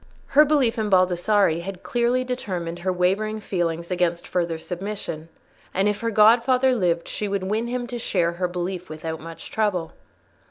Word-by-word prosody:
Her 295 +2 +7
belief 265 -6 +2
in 215 -1 0
Baldassarre 185 -1 +3
had 190 +1 -7
clearly 245 +1 +1
determined 180 -9 -4
her 185 +2 -1
wavering 195 +5 0
feelings 170 -4 -2
against 175 -1 0
further 170 -2 -1
submission, 175 -2 -6 0.5
and 195 +2 +2
if 210 0 0
her 230 - -1
godfather 240 +4 +5
lived 175 -7 0
she 210 - -3
would 200 -1 -2
win 215 +5 -1
him 245 0 -2
to 240 0 -5
share 175 -6 +1
her 180 +1 -2
belief 180 +1 -4
without 160 +1 -5
much 165 +1 -9
trouble. 195 -7 -1
190 Hz, 165 wpm, -24 LUFS, 175-220 Hz, 0.5 s, Her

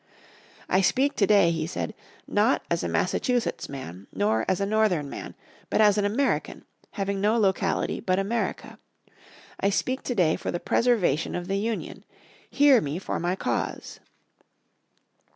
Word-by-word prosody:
"I 185 - +3
speak 275 +9 +2
today," 200 -4 +4
he 160 -1 -2
said, - - -4 0.3
"not - - +2
as - - 0
a - - -1
Massachusetts 245 -3 -1
man, 100 -9 -8
nor 110 +3 0
as 185 - +1
a 200 - 0
Northern 200 -9 +1
man, - - -7 0.3
but - - 0
as 210 -2 +6
an 205 -1 +1
American, 250 +7 -1 0.3
having 195 -1 -2
no 215 +3 +2
locality 195 -2 0
but 185 0 0
America. 215 +4 -3 0.8
I 195 - +2
speak 255 +6 -1
today 180 -10 +1
for - - -5
the 175 - -2
preservation 200 - +1
of 175 0 -4
the 195 +1 -1
Union. 225 +1 -4 0.5
Hear 280 -4 +5
me 145 +2 -3
for 190 - -3
my 175 +2 -1
cause." - - -3
195 Hz, 150 wpm, -26 LUFS, 175-220 Hz, 0.8 s, as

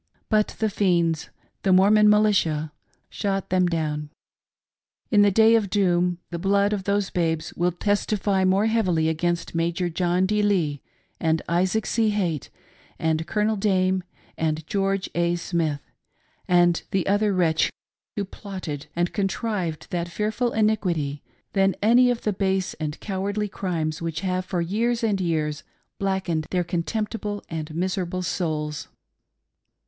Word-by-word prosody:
But 215 -1 +2
the 220 - +1
fiends 170 -5 +1 0.2
— - - -42
the 195 - +2
Mormon 210 +3 +6
militia 190 -8 +2 0.2
— - - -39
shot 195 -2 -2
them 185 -1 +3
down. 150 -3 -2 1.0
In 205 -3 +6
the 205 - +6
day 220 +3 +5
of 220 -4 +2
doom, 180 -3 +2
the 170 - -3
blood 200 +2 +2
of 195 -2 -3
those" 200 -1 0
babes 165 -1 -1
will 175 +1 +1
testify 200 +1 0
more 190 +3 +3
heavily 185 -8 +2
against 170 +1 -1
Major 170 +2 0
John 175 +2 +1
D. 210 +2 +1
Lee 170 -9 +1 0.4
and 160 -1 +1
Isaac 185 +5 +1
C. 225 -2 +1
Haight, 180 -8 -1 0.5
and 160 0 0
Colonel 210 +3 +1
Dame, 190 -2 +1 0.4
and 155 -1 -1
George 195 +1 0
A. 170 0 +1
Smith, 165 -4 -1 0.7
and 175 -1 +4
the 190 -2 0
other 205 +1 +2
wretch 170 -4 +2 0.5
who 205 - -1
plotted 185 -7 -7
and 175 +1 0
contrived 195 -4 -2
that 175 -1 -2
fearful 215 +6 -1
iniquity, 180 -10 0 0.3
than 195 -1 +3
any 240 +4 +5
of 245 -1 -1
the 210 - 0
base 190 -1 0
and 150 -1 -4
cowardly 205 +1 -2
crimes 165 -6 -3
which 165 -1 -3
have 185 -1 -1
for 180 -2 -2
years 230 +7 0
and 205 -4 +1
years 155 -4 -1 0.4
blackened 190 -5 -1
'their 180 -1 +1
contemptible 205 +5 -3
and 155 -1 -5
miserable 185 0 -2
souls. 155 -4 -2
185 Hz, 145 wpm, -24 LUFS, 165-205 Hz, 1.0 s, Mormon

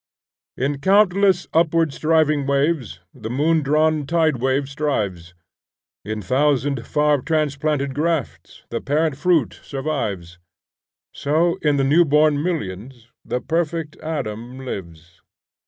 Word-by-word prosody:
In 140 +2 -1
countless 195 0 +3
upward 165 -2 +2
striving 155 -3 +1
waves 140 - 0
The 110 -3 -7
moon 155 +6 +2
drawn 155 0 +1
tide 160 -3 +2
wave 135 +3 0
strives: 105 - -3 0.7
In 110 0 -5
thousand 135 -1 +1
far 150 -2 +2
transplanted 150 -2 -1
grafts 155 -1 -3
The 115 - -2
parent 155 +1 0
fruit 165 -3 +1
survives; 105 - -4 0.7
So, 160 +4 +1
in 150 -2 +2
the 135 - +2
new 150 +6 +5
born 150 -1 +3
millions, 120 - -5
The 125 - -3
perfect 165 -1 -2
Adam 130 -4 -5
lives. 85 -6 -8
145 Hz, 115 wpm, -21 LUFS, 125-160 Hz, 0.7 s, new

